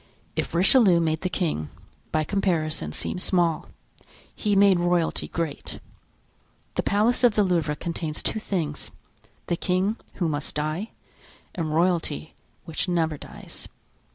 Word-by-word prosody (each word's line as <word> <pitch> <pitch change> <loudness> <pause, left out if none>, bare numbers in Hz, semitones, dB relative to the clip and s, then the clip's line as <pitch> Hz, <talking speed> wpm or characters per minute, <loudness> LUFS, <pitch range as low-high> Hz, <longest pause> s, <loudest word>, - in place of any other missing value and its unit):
If - - -2
Richelieu 190 0 +6
made 160 -1 0
the 185 - -1
king, 155 - -1 0.4
by 155 - +2
comparison, 170 -4 0
seem - - -3
small, 175 -3 +2 0.7
he 205 -2 0
made 195 -2 +6
royalty 175 -1 +1
great. 165 -4 -4 0.9
The - - 0
Palace 220 +5 +2
of 235 -4 +5
the 210 - +4
Louvre 165 -5 +1
contains 160 -1 -4
two 220 - 0
things—the 170 -2 -5
king, 190 +6 +1 0.2
who 175 - 0
must 145 -2 -2
die, 155 +8 -2 0.6
and 160 -3 -2
royalty, 170 - 0 0.3
which 160 +3 -1
never 165 -3 +1
dies. - - -9
175 Hz, 125 wpm, -25 LUFS, 155-190 Hz, 0.9 s, Richelieu